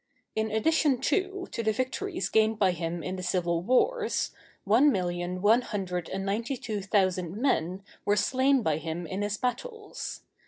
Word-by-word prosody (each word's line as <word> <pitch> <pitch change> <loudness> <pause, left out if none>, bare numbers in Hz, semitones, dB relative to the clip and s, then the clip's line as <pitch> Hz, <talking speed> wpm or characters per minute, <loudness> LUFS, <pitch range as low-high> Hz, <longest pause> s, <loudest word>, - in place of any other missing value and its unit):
In 220 0 0
addition, 270 +4 +2
too, 380 +6 -1
to - - -2
the 220 -1 +2
victories 295 - -2
gained 220 0 +3
by 195 -3 +3
him 170 0 -3
in 185 +1 -3
the - - -5
civil 175 -2 0
wars, 435 - +1 0.3
one 240 +9 +5
million 180 -1 -2
one 225 +4 +5
hundred 185 -7 -3
and 195 0 -3
ninety 230 +7 -1
two 215 -4 -4
thousand 185 -2 +1
men 190 - 0 0.2
were 205 - +2
slain 260 +5 +3
by 155 -5 +1
him 160 +2 -4
in 185 +5 -4
his 205 0 -1
battles. 415 - -4
210 Hz, 165 wpm, -28 LUFS, 180-255 Hz, 0.3 s, one